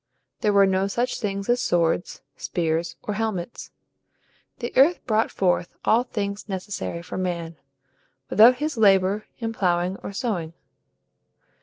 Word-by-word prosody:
There 215 -3 +2
were 200 -1 +6
no 190 0 +1
such 240 +5 -1
things 200 -2 -3
as 245 0 +2
swords, 175 -5 0
spears, 165 0 -2
or 210 - -3
helmets. 215 -2 -4 0.9
The 240 - -5
earth 295 +7 +4
brought 220 -2 +2
forth 180 -2 0
all 225 +2 +4
things 200 -3 -4
necessary 190 -3 -4
for 180 - -6
man, 170 -3 -3 0.7
without 235 +4 +7
his 295 0 -3
labor 195 -1 +3
in 225 -1 -3
ploughing 180 -2 0
or - - -7
sowing. 195 -7 -3
200 Hz, 135 wpm, -24 LUFS, 180-225 Hz, 0.9 s, without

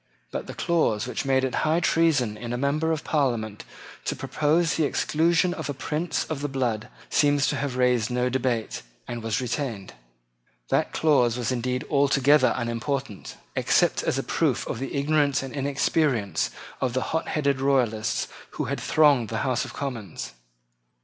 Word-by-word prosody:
But - - -4
the - - -7
clause 155 -11 +1
which 125 - -3
made 135 -1 +2
it 130 - -1
high 160 +2 +2
treason 160 -10 +2
in 120 +2 -5
a - - -1
member 150 +5 0
of 160 -2 -2
Parliament 120 -8 -1 0.4
to - - -1
propose 160 +2 +1
the 160 - +1
exclusion 165 +4 +2
of 160 -4 -5
a 145 - -3
prince 155 +6 -2
of 155 -3 -4
the 145 - -1
blood 120 -6 -1 0.2
seems 145 -1 +3
to - - -1
have 135 -2 -3
raised 125 -3 +2
no 125 0 0
debate, 125 -3 -1 0.3
and 120 - -5
was 110 -2 -1
retained. 120 - -3 0.8
That - - +1
clause 125 -7 +3
was 125 0 -1
indeed 125 +1 -2
altogether 140 0 +4
unimportant, 120 -2 -3 0.2
except - - +2
as - - 0
a - - -1
proof - - 0
of - - -4
the 135 +2 -4
ignorance 145 -1 +2
and 135 - -7
inexperience 140 -5 0 0.3
of 125 -2 0
the 130 - 0
hotheaded 140 -4 0
Royalists 125 -6 +1 0.3
who - - -1
thronged 145 -7 +3
the 110 +3 -2
House 125 -4 0
of - - -9
Commons. 115 - -5
135 Hz, 165 wpm, -25 LUFS, 120-150 Hz, 0.8 s, altogether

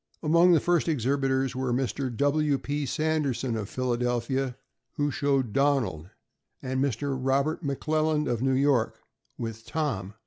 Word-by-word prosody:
Among 170 +3 +5
the 165 - +5
first 175 +2 +1
exhibitors 135 -2 0
were 130 -1 -1
Mr. 130 +1 -1
W. 145 0 +2
P. 145 +1 -3
Sanderson, 140 -5 0
of 105 -2 -4
Philadelphia, 125 +1 -1 0.4
who 145 0 0
showed 135 -7 0
Donald, 135 - +1 0.5
and 130 +1 -1
Mr. 140 +1 -1
Robert 135 +5 0
McLelland, 155 +2 0
of 120 -2 -1
New 135 0 +2
York, 135 -4 +2 0.4
with 115 -1 -5
Tom. 110 - -3
135 Hz, 135 wpm, -27 LUFS, 125-145 Hz, 0.5 s, Among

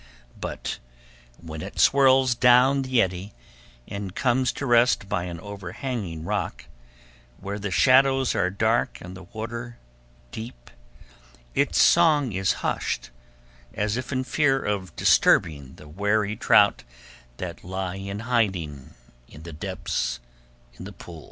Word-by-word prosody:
But - - -5 0.6
when 80 -2 -8
it - - -8
swirls 135 -2 +5
down 125 +3 +5
the 130 -3 +2
eddy, 95 +2 -5 0.5
and 100 -1 -6
comes 130 0 +1
to 140 - -5
rest 120 -4 +3
by 95 -4 -2
an 85 -2 -6
overhanging 100 -2 -6
rock, 85 - -3 0.7
where 100 +1 -5
the 100 0 -3
shadows 130 - +4
are 90 - +1
dark 110 +5 0
and 90 +1 -10
the 95 - -10
water 115 +3 -7 0.5
deep, 110 - -9 0.8
its - - +1
song 155 -7 +4
is 95 0 +1
hushed, - - -2 0.6
as 105 +1 -1
if 130 +2 -5
in 130 -1 -1
fear 135 0 +1
of 100 -7 -3
disturbing 70 -5 +2
the 75 - -14
wary 105 +5 0
trout - - +4 0.5
that - - -7
lie 95 0 -4
in 100 +1 -6
hiding 95 - -2 0.3
in 75 - -14
the 85 -1 -9
depths 80 -7 -3 0.6
of - - -8
the - - -9
pool. 85 -2 -11
105 Hz, 130 wpm, -25 LUFS, 90-125 Hz, 0.8 s, swirls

